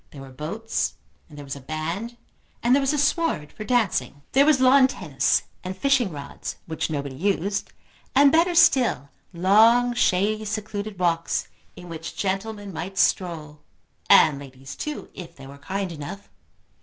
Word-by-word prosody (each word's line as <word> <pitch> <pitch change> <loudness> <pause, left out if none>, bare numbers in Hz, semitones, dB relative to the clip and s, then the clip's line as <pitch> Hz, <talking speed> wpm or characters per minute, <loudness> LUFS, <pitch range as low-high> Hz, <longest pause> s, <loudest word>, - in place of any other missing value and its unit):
There 140 - -11
were 135 - -12
boats, 165 - -3 0.3
and 150 - -13
there 145 - -9
was 135 - -5
a - - -9
band, 165 - -5 0.5
and 240 +1 +4
there 280 - +4
was 270 0 +1
a 300 - -1
sward 290 - 0
for - - -8
dancing. 195 - 0
There 280 +2 +4
was 300 -4 +4
lawn 260 +1 +6
tennis, 150 - 0 0.2
and 185 +1 -6
fishing 270 -8 +2
rods, 140 -2 -7
which 160 0 -3
nobody 140 -3 -4
used, 195 +4 -1 0.4
and 280 +1 +6
better 340 +3 +3
still, 245 - +4 0.2
long 220 +7 +4
shady 215 -1 +1
secluded 210 -1 -4
walks 170 -2 0 0.3
in 180 - -11
which 165 -1 -8
gentlemen 200 +1 -3
might 190 +4 -6
stroll, 155 -7 0 0.5
and 145 -3 +6
ladies 135 -1 -11
too, 300 -1 -6
if 175 -3 -10
they 135 - -12
were 140 +1 -12
kind 190 +4 -4
enough. 165 +6 -8
195 Hz, 160 wpm, -24 LUFS, 150-235 Hz, 0.5 s, lawn